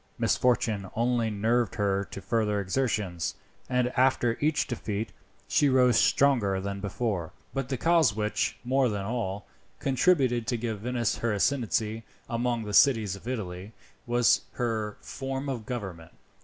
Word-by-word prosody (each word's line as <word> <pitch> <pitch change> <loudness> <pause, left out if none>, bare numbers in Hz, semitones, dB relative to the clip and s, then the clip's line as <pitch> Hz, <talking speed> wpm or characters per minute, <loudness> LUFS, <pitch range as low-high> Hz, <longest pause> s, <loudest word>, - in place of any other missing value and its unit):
Misfortune 110 -6 +1
only 120 -1 +1
nerved 110 +1 +1
her 100 -1 +1
to 100 - -9
further 110 -3 0
exertions, 100 -5 -1 0.3
and 125 -1 +2
after 125 -2 +2
each 150 0 +2
defeat 110 -3 -4 0.4
she 145 - +3
rose 125 -2 +4
stronger 115 -9 +3
than 100 +1 -4
before. 100 -4 -3 0.2
But 135 -1 -3
the 130 - -1
cause 160 -8 +3
which, 105 0 -1
more 130 +1 +2
than 100 -2 -3
all, 105 -3 -3 0.3
contributed 130 -4 +2
to 120 0 0
give 110 -2 -3
to - - -13
Venice 120 -3 0
her 115 -2 0
ascendancy 110 -1 0 0.2
among 120 0 -1
the 105 -1 -5
cities 110 -5 +4
of 100 +4 -12
Italy, 100 -4 -5 0.3
was 120 0 +4
her 110 -3 -2
form 135 +1 -5
of 125 -5 -4
government. 95 -10 -6
115 Hz, 145 wpm, -28 LUFS, 105-125 Hz, 0.4 s, rose